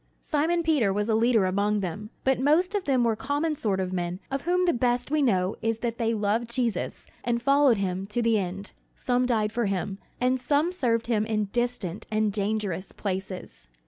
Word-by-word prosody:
Simon 330 +3 +1
Peter 290 -11 +2
was 205 +3 -1
a - - +3
leader 225 -2 +3
among 200 +3 +1
them, 200 +4 -5
but 265 -1 +2
most 315 +8 +3
of 405 -3 -1
them 260 -3 +2
were 230 -2 +2
common 290 +6 -1
sort 205 -8 -1
of 185 -1 -2
men 175 0 -2
of 275 0 -1
whom 360 +3 +1
the 345 - +3
best 245 +2 0
we 305 -1 +2
know 190 -7 +2
is 225 0 0
that 230 0 -3
they 230 -1 +1
loved 220 +2 0
Jesus 235 -6 -1 0.2
and 235 0 0
followed 275 -1 +4
him 190 0 -2
to 210 +4 -2
the 225 -2 +3
end. 195 +2 -5 0.2
Some 250 0 0
died 215 -3 +1
for 235 -1 0
him, 195 0 -2 0.2
and 255 +1 +2
some 290 +6 +1
served 235 -10 0
him 225 -3 +1
in 215 -2 -1
distant 240 -6 -2
and 215 -1 +1
dangerous 205 -3 -2
places. 190 - -5
225 Hz, 200 wpm, -26 LUFS, 200-260 Hz, 0.2 s, followed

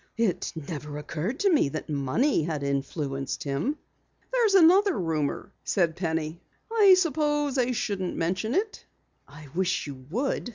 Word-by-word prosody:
It 225 -6 0
never 150 -1 -6
occurred 170 - -4
to 395 -3 +4
me 285 - +3
that 155 - -5
money 150 - +1
had 155 -2 -3
influenced 140 0 -2
him." 145 - -1 0.6
"There's 455 -5 +3
another 380 +2 +6
rumor," 160 +2 -2
said 170 -4 +1
Penny. 165 -2 -2 0.3
"I 410 -4 +7
suppose 295 -4 +1
I 250 0 +2
shouldn't 200 -6 -2
mention 185 - -1
it." 415 +3 -1 0.4
"I 145 0 -13
wish 185 +1 0
you 130 -3 -9
would." 245 - -1
180 Hz, 140 wpm, -27 LUFS, -, 0.6 s, I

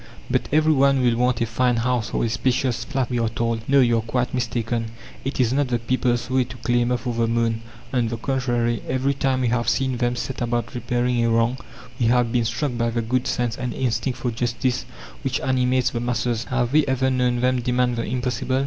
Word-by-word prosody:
"But - - 0
every 155 +1 +4
one 140 -2 +3
will 120 -2 +3
want 125 0 +1
a - - +3
fine 120 +2 +1
house 120 -1 0
or - - 0
a - - 0
spacious 125 +2 0
flat!" 135 -4 -2
we 120 - 0
are 115 -1 +1
told. 115 0 -1
No, 140 0 +6
you 120 -2 +3
are - - -1
quite 120 +2 -2
mistaken. 115 -1 -1 0.4
It 135 +1 -3
is 125 -1 +3
not 140 0 +2
the 120 -1 0
people's 120 0 0
way 130 0 +2
to 125 0 -10
clamour 120 +1 +1
for 120 0 -4
the 115 0 +1
moon. 115 -1 0 0.3
On 120 -3 +2
the 115 0 -3
contrary, 120 -2 0
every 130 +2 +1
time 135 -1 0
we 125 - +1
have 120 0 +1
seen 130 -2 0
them 120 0 0
set 130 +2 -4
about 120 -1 -1
repairing 120 0 0
a 115 - +2
wrong 115 +3 +2 0.4
we 120 - +2
have 120 -1 +3
been 120 -1 +1
struck 135 +2 -1
by 115 0 +1
the 115 0 -1
good 125 +3 0
sense 120 -2 -1
and 125 -1 -4
instinct 120 0 -1
for 125 - -2
justice 120 +2 -1 0.4
which - - 0
animates 130 -1 +1
the 120 - -2
masses. 120 -1 -1
Have 125 0 -1
we 155 0 +5
ever 130 0 +1
known 125 -1 +1
them 125 0 +2
demand 125 0 +1
the 115 - -1
impossible? 130 +1 -1
125 Hz, 220 wpm, -23 LUFS, 115-130 Hz, 0.4 s, No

